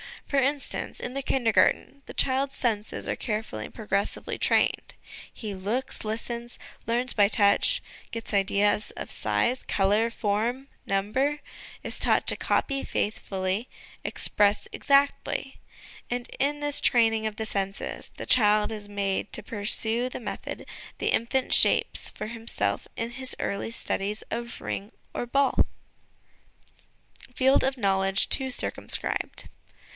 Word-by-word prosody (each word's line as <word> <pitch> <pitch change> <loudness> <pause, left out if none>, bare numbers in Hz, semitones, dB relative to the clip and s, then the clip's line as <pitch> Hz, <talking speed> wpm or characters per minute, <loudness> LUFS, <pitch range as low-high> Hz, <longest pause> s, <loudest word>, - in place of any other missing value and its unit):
For 280 - -1
instance, 275 +1 -1
in 245 - -4
the 275 - -2
Kindergarten 265 +2 +2
the - - -9
child's 270 +1 +1
senses 220 -3 -2
are - - -1
carefully 210 - -3
and - - -12
progressively 200 -2 -2
trained: - - +1 0.4
he 215 -3 -6
looks, 210 +7 -2
listens, 235 +2 -4 0.3
learns 245 +2 0
by 205 -2 +5
touch; 200 -1 +4 0.3
gets 230 -1 -6
ideas 200 +1 +2
of - - -8
size, 250 +2 0
colour, 205 +4 +2
form, 230 +5 -1 0.2
number; 255 +10 0 0.4
is - - -3
taught - - +3
to - - +6
copy 275 -1 0
faithfully, 195 +1 -2 0.3
express 205 0 +2
exactly. 280 -1 +1 0.5
And 245 0 -3
in 290 +2 0
this 290 -1 +1
training 225 -2 +3
of 215 - -5
the 220 - -3
senses, 195 -2 -3
the - - -6
child 210 -2 +4
is 210 -2 -7
made 200 0 -2
to - - -2
pursue 225 +3 +2
the 250 - -7
method - - -6 0.3
the - - -1
infant 250 +3 +1
shapes - - +5
for 215 - -6
himself 230 0 -2
in 230 0 -3
his 260 +1 +1
early 200 +2 -2
studies 210 -2 -3
of 235 +1 -5
ring 200 +2 -5 0.2
or 240 - -3
ball. 275 +2 +3 1.7
Field 265 +1 +4
of 265 0 0
Knowledge 195 -2 +2
too 265 -1 +3
circumscribed. 250 - -1
225 Hz, 130 wpm, -27 LUFS, 205-255 Hz, 1.7 s, to